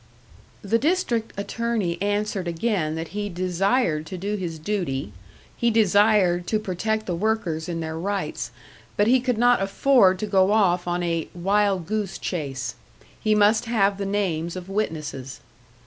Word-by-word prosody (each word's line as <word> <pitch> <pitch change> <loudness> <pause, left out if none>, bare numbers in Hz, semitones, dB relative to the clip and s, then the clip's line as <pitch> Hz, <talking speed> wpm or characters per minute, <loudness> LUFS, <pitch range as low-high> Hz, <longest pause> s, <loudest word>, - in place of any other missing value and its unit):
The 225 +3 +1
District 280 -9 0
Attorney 210 -4 -2
answered 205 -2 -1
again 170 -2 -1
that 160 0 -5
he 205 0 -3
desired 180 -1 0
to 185 - -6
do 200 +4 -2
his 175 -5 -4
duty, 155 - -3 0.4
he 235 - +1
desired 205 -4 +3
to 215 - +1
protect 215 +3 -2
the 180 - -2
workers 175 -4 -1
in 165 -1 -3
their 160 0 -4
rights; 200 +2 -3 0.5
but 205 - +4
he 255 +4 +5
could 250 -2 0
not 245 -1 +4
afford 195 0 +4
to 215 - -3
go 195 -1 +3
off 180 -5 +2
on 175 0 -1
a 165 -2 -1
"wild 195 0 +1
goose 205 0 -2
chase," 135 -7 -4 0.5
he 215 -1 +2
must 210 +3 +4
have 200 -4 +1
the 200 - -2
names 175 -5 -1
of 185 0 -7
witnesses. 155 -10 -3
195 Hz, 155 wpm, -24 LUFS, 170-215 Hz, 0.5 s, he